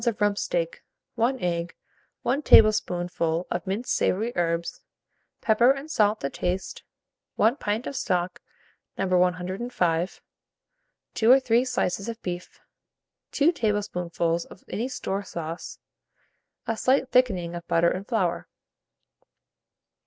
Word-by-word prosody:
of 230 -3 0
rump 205 -1 +2
steak, 170 -4 -2 0.3
1 245 +3 +1
egg, 170 -1 -2 0.5
1 265 +5 +1
tablespoonful 175 - +3
of 175 +1 -3
minced 205 +6 -1
savoury 225 +6 0
herbs, 170 -1 -1 0.6
pepper 235 +3 +4
and 275 +3 0
salt 210 -4 +2
to 140 - 0
taste, 180 +1 -3 0.5
1 230 +5 +3
pint 215 +1 -2
of 280 - -5
stock, 180 -6 -1 0.6
No. - - 0
105, 180 0 0 0.9
2 225 +2 +4
or 265 - +8
3 245 -2 +2
slices 200 -4 -1
of 230 0 -6
bacon, 175 0 -4 0.8
2 300 +4 +3
tablespoonfuls 180 - -1
of 185 - -15
any 235 +4 -2
store 225 -6 -3
sauce, 170 -4 -6 0.9
a 225 - -1
slight 260 +3 +2
thickening 190 -9 +2
of 170 0 -7
butter 170 +1 +3
and 195 +3 -5
flour. 185 -8 -1
195 Hz, 125 wpm, -26 LUFS, 175-235 Hz, 0.9 s, or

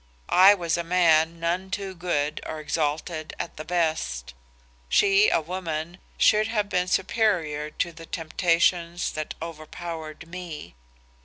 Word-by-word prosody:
I 195 +3 +9
was 170 -3 -1
a - - -1
man 165 -2 +3
none 175 +3 -1
too 195 -1 -4
good 155 -4 -1
or 155 - -5
exalted 155 +1 -2
at - - -5
the 155 - -5
best; 155 - -1 0.6
she, 200 +1 +5
a - - +3
woman, 170 0 -4 0.2
should 215 0 +4
have 210 -3 -1
been 180 -1 +1
superior 180 -7 0
to 170 +3 -2
the 165 0 -12
temptations 170 +1 +1
that 155 0 -5
overpowered 165 0 -7
me. 170 - -8
170 Hz, 135 wpm, -25 LUFS, 155-180 Hz, 0.6 s, I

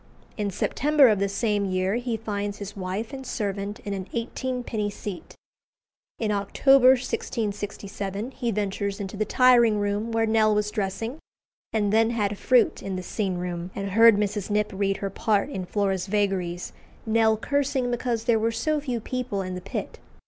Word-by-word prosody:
In 205 -2 -1
September 280 +7 +3
of 210 -3 +2
the 200 0 +1
same 210 0 0
year 185 0 0
he 240 -2 -2
finds 205 -2 -3
his 205 0 -7
wife 200 +6 -4
and 265 -1 -6
servant 205 -4 -3
in 205 - -4
an 190 -1 -5
eighteenpenny 235 -2 -2
seat. 200 -2 -7 0.8
In 220 -2 -1
October 255 +6 +5
1667 205 -3 -4
he 245 -2 -3
ventures 200 -1 -2
into 200 0 -5
the 215 +1 0
tiring 240 -2 +5
room 205 +2 -1
where 225 0 +2
Nell 220 -1 +3
was 210 0 0
dressing, 225 +6 -3 0.5
and 210 -2 +1
then 225 +1 +4
had 210 -3 -1
fruit 250 -3 +3
in 195 -1 -4
the 185 - -4
scene 190 -1 -2
room, 175 0 -4
and 200 0 -3
heard 225 +1 +7
Mrs. 205 -1 -1
Knipp 210 0 +1
read 195 0 0
her 195 -2 -4
part 210 +5 0
in 185 -8 -4
"Flora's 195 -2 0
Vagaries," 190 -4 -1 0.3
Nell 220 0 +3
cursing 275 0 0
because 240 -2 -1
there 230 -2 +3
were 225 +1 +1
so 305 +6 0
few 255 -5 -3
people 240 -4 -3
in 185 0 -5
the 180 - -5
pit. - - -5
210 Hz, 170 wpm, -25 LUFS, 200-230 Hz, 0.8 s, heard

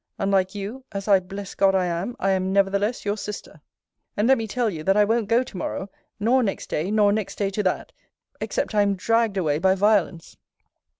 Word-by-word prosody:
Unlike 195 -1 +1
you, 210 +7 -6
as 195 0 -5
I 200 -2 +6
bless 195 +2 -8
God 195 -1 +3
I 185 -1 +2
am, 175 +7 -3
I 195 - +1
am 190 0 0
nevertheless 200 +4 +1
your 205 +1 -1
sister 210 0 -8 0.6
and 210 +2 +2
let 265 -1 +4
me 225 - -3
tell 240 +3 -1
you, 165 -7 -4
that 195 +4 +2
I 210 - +5
won't 225 0 0
go 235 +2 +3
to 210 - -10
morrow, 190 +2 -4 0.3
nor 240 +5 +3
next 205 -5 -3
day, 160 +5 -1
nor 210 -1 +3
next 210 -1 -2
day 200 -1 -1
to 210 - -1
that 185 -2 -2 0.5
except - - -2
I 210 - +4
am 200 -1 +2
dragged 225 +1 +1
away 155 -5 +1
by 190 +2 +3
violence. 195 -4 +1
200 Hz, 215 wpm, -24 LUFS, 190-215 Hz, 0.6 s, I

